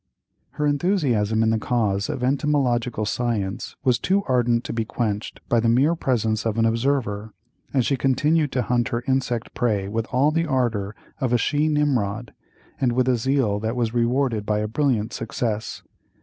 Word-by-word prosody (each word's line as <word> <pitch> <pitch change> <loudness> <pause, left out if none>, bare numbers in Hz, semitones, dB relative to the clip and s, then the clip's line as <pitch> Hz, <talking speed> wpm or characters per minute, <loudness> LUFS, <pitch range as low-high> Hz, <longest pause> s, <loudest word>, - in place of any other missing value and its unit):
Her 150 - -1
enthusiasm 140 - +1
in 110 - +2
the 110 - +1
cause 105 -4 0
of 125 - -3
entomological 125 -5 +1
science 105 -3 -2
was 125 -4 +2
too 200 +2 +1
ardent 120 -2 +2
to - - -5
be 115 -1 -1
quenched 110 -2 -4
by 120 - +2
the 115 0 +2
mere 135 +8 +4
presence 115 -8 0
of 115 -1 -1
an 115 - +3
observer, 115 -3 -1 0.4
and 130 -4 +1
she 140 - +2
continued 145 +3 +2
to 125 - +1
hunt 120 -1 +1
her 120 -2 -2
insect 125 -3 -1
prey 105 -6 0
with 110 +2 -2
all 135 +4 +2
the 165 +1 0
ardor 115 -7 -1 0.2
of 125 -2 0
a - - +5
she 145 +6 +1
Nimrod, 125 -8 0 0.5
and 125 -3 +1
with 125 +1 +1
a 130 - +4
zeal 120 -4 +1
that 110 +2 -2
was 115 -2 -1
rewarded 120 -1 +1
by 105 0 0
a 105 0 -1
brilliant 115 -2 0
success. 115 -1 -3
120 Hz, 175 wpm, -23 LUFS, 110-135 Hz, 0.5 s, a